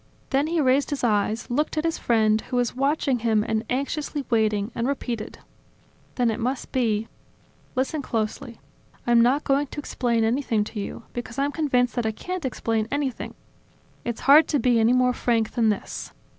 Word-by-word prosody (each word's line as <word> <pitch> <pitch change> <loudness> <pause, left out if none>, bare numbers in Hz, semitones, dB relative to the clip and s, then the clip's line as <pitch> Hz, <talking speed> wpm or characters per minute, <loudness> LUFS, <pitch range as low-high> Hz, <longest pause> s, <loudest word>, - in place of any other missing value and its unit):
Then 280 +2 +2
he 335 +1 0
raised 275 0 +3
his 285 -3 -3
eyes, 215 0 +1
looked 300 +5 0
at 310 - +1
his 330 -1 -1
friend, 220 -2 +2
who 255 - -2
was 245 -1 0
watching 275 -1 +1
him 220 -2 +2
and 220 0 0
anxiously 280 +2 -2
waiting, 215 -1 +1
and 235 +1 -1
repeated: 245 -5 -3 0.8
"Then 245 -3 +2
it 220 - -4
must 250 +3 -2
be?... 225 -4 0 0.7
Listen 270 +4 0
closely. 230 0 -3 0.5
I'm 240 -1 +5
not 260 +5 +3
going 280 +1 +1
to 295 - -7
explain 235 -5 0
anything 225 -2 +1
to 210 +1 -6
you, 200 - -6
because 240 0 -6
I'm 280 +1 +1
convinced 255 -6 +1
that 240 -3 -1
I - - +1
can't 360 +7 -5
explain 225 -3 -1
anything. 280 -3 -3 0.7
It's 235 -2 -4
hard 290 +4 +7
to 295 - +1
be 245 -2 +3
any 225 +1 +4
more 250 0 +3
frank 230 -3 0
than 230 -2 +2
this. 210 - -3
245 Hz, 180 wpm, -24 LUFS, 225-275 Hz, 0.8 s, hard